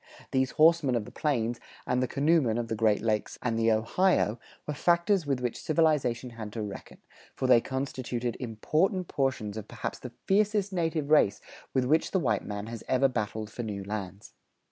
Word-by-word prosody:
These 130 Hz, -1 st, +1 dB
horsemen 155 Hz, -4 st, +5 dB
of 115 Hz, -3 st, -1 dB
the -, -, -11 dB
plains 120 Hz, -6 st, -1 dB, 0.3 s
and 125 Hz, 0 st, +1 dB
the 130 Hz, -, +1 dB
canoemen 140 Hz, -5 st, +2 dB
of 120 Hz, -1 st, -3 dB
the 110 Hz, -, -1 dB
Great 110 Hz, -2 st, +2 dB
Lakes 110 Hz, -1 st, -1 dB
and 120 Hz, -2 st, 0 dB
the 115 Hz, 0 st, +3 dB
Ohio 115 Hz, -, +2 dB, 0.3 s
were 150 Hz, -, -3 dB
factors 170 Hz, +3 st, +2 dB
with 135 Hz, -3 st, 0 dB
which 125 Hz, -2 st, -3 dB
civilization 145 Hz, -7 st, +1 dB
had 110 Hz, -2 st, -7 dB
to 110 Hz, -, -3 dB
reckon, 100 Hz, -2 st, -8 dB, 0.4 s
for -, -, -2 dB
they 125 Hz, -2 st, +6 dB
constituted 125 Hz, -3 st, -3 dB
important 155 Hz, -, 0 dB
portions 125 Hz, -7 st, -1 dB
of 110 Hz, -1 st, -6 dB
perhaps 115 Hz, -3 st, -5 dB
the 125 Hz, -2 st, -9 dB
fiercest 205 Hz, 0 st, +2 dB
native 165 Hz, -4 st, -1 dB
race 105 Hz, -10 st, +4 dB, 0.4 s
with 130 Hz, -1 st, +2 dB
which 155 Hz, +5 st, +2 dB
the 190 Hz, -, +1 dB
white 110 Hz, -, 0 dB
man 105 Hz, 0 st, -5 dB
has 115 Hz, 0 st, -7 dB
ever 130 Hz, +1 st, +3 dB
battled 110 Hz, -3 st, -3 dB
for 120 Hz, -, -5 dB
new 105 Hz, -4 st, -4 dB
lands. 100 Hz, -1 st, -6 dB
125 Hz, 185 wpm, -28 LUFS, 110-155 Hz, 0.4 s, they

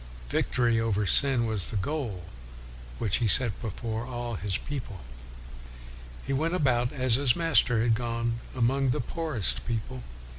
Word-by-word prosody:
Victory 120 Hz, -, +1 dB
over 105 Hz, -2 st, 0 dB
sin 125 Hz, +4 st, +5 dB
was 110 Hz, -5 st, +3 dB
the -, -, -6 dB
goal 110 Hz, -, -3 dB, 0.7 s
which 105 Hz, -5 st, 0 dB
he 115 Hz, -, 0 dB
set 115 Hz, 0 st, +1 dB
before 110 Hz, +1 st, -4 dB
all 120 Hz, -1 st, -5 dB
his 100 Hz, -2 st, -2 dB
people.' 135 Hz, -7 st, -6 dB
1 -, -, -10 dB, 1.3 s
He -, -, -2 dB
went 160 Hz, +6 st, 0 dB
about, 125 Hz, -7 st, +1 dB
as 130 Hz, -3 st, +1 dB
his 125 Hz, -4 st, +3 dB
Master 140 Hz, -9 st, +2 dB
had 115 Hz, -1 st, +3 dB
gone, 115 Hz, 0 st, -2 dB, 0.2 s
among 130 Hz, +2 st, +1 dB
the 120 Hz, -, 0 dB
poorest 115 Hz, -, -1 dB
people. 105 Hz, -, -4 dB
120 Hz, 150 wpm, -27 LUFS, 110-130 Hz, 1.3 s, sin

